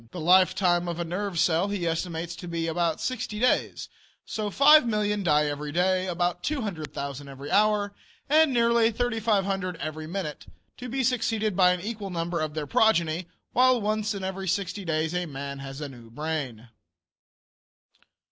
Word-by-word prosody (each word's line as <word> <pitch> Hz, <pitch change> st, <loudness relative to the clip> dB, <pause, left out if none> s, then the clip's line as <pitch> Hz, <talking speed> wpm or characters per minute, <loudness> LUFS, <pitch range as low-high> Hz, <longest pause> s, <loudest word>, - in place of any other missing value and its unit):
The 175 Hz, -, -8 dB
lifetime 175 Hz, +1 st, +3 dB
of 170 Hz, 0 st, -4 dB
a -, -, 0 dB
nerve 180 Hz, +2 st, -3 dB
cell 165 Hz, +3 st, +2 dB
he 200 Hz, -4 st, -2 dB
estimates 165 Hz, 0 st, -2 dB
to 175 Hz, -, -8 dB
be 170 Hz, -1 st, -2 dB
about 165 Hz, -1 st, 0 dB
sixty 245 Hz, -4 st, -3 dB
days, 250 Hz, +2 st, +1 dB, 0.4 s
so 215 Hz, -1 st, -3 dB
that -, -, -12 dB
5,000,000 220 Hz, -8 st, +5 dB
die 150 Hz, -3 st, +3 dB
every 145 Hz, 0 st, -3 dB
day, 185 Hz, +3 st, +1 dB
about 175 Hz, 0 st, -1 dB
200,000 155 Hz, -, -4 dB
every 140 Hz, +1 st, -8 dB
hour, 205 Hz, -1 st, +2 dB, 0.3 s
and 310 Hz, 0 st, +5 dB
nearly 235 Hz, -2 st, +3 dB
3,500 210 Hz, -6 st, 0 dB
every 155 Hz, -1 st, -5 dB
minute, 170 Hz, -3 st, -5 dB, 0.3 s
to 250 Hz, 0 st, -7 dB
be 265 Hz, +2 st, -1 dB
succeeded 225 Hz, -4 st, 0 dB
by 180 Hz, -1 st, +5 dB
an 180 Hz, -1 st, -1 dB
equal 210 Hz, -1 st, -5 dB
number 170 Hz, -1 st, -2 dB
of 155 Hz, -1 st, -3 dB
their 155 Hz, -1 st, -2 dB
progeny; 170 Hz, -1 st, +2 dB, 0.3 s
while 255 Hz, 0 st, +4 dB
once 215 Hz, 0 st, -1 dB
in 195 Hz, -, -5 dB
every 190 Hz, 0 st, -4 dB
sixty 195 Hz, +2 st, -2 dB
days 160 Hz, -1 st, -1 dB
a 180 Hz, -1 st, -1 dB
man 140 Hz, -1 st, -6 dB
has 135 Hz, 0 st, -7 dB
a 145 Hz, -, -3 dB
new 120 Hz, -3 st, -13 dB
brain. 130 Hz, -4 st, -4 dB
180 Hz, 165 wpm, -26 LUFS, 160-210 Hz, 0.4 s, 5,000,000